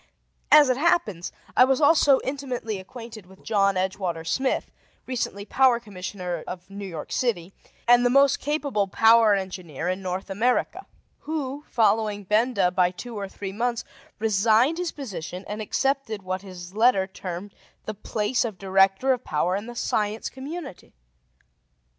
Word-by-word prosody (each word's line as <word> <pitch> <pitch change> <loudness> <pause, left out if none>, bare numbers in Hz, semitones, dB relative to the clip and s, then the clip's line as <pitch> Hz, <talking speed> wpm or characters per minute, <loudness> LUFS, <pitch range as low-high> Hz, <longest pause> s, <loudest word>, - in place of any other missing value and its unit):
As 300 -3 +8
it 255 - +2
happens, 215 - +1 0.2
I - - +7
was 260 0 +2
also 290 -2 +5
intimately 255 -6 -4
acquainted 220 0 -10
with 190 0 -18
John 200 -3 +2
Edgewater 185 -3 -2
Smith, 265 +10 -1 0.3
recently 225 -5 -3
Power 255 0 +3
Commissioner 185 -5 -6
of 180 +1 -8
New 200 0 -6
York 165 -5 -7
City 195 -7 -1 0.3
and 245 0 +6
the 245 - +4
most 275 +1 +4
capable 285 -8 -1
power 225 +1 +5
engineer 180 -5 -5
in 185 +1 -2
North 185 +1 -4
America, 235 +6 0 0.3
who, 295 -2 -4
following 215 -2 +1
Benda 210 -2 +2
by 180 -1 +3
two 230 +6 -9
or 200 -2 -4
three 195 0 -7
months, 235 +2 -1 0.3
resigned 225 - +3
his 360 -2 -2
position, 190 - -7
and 210 +1 -5
accepted 245 -2 -1
what 185 0 -3
his 180 -2 -10
letter 220 -3 +4
termed 190 0 -7 0.3
the 215 - -4
place 215 +3 -1
of 220 -5 -4
Director 195 +6 +3
of 250 -1 -5
Power 175 +5 0
in 205 +3 -4
the 240 - -8
Science 215 -1 -1
Community. 275 - -8
210 Hz, 150 wpm, -25 LUFS, 190-250 Hz, 0.3 s, As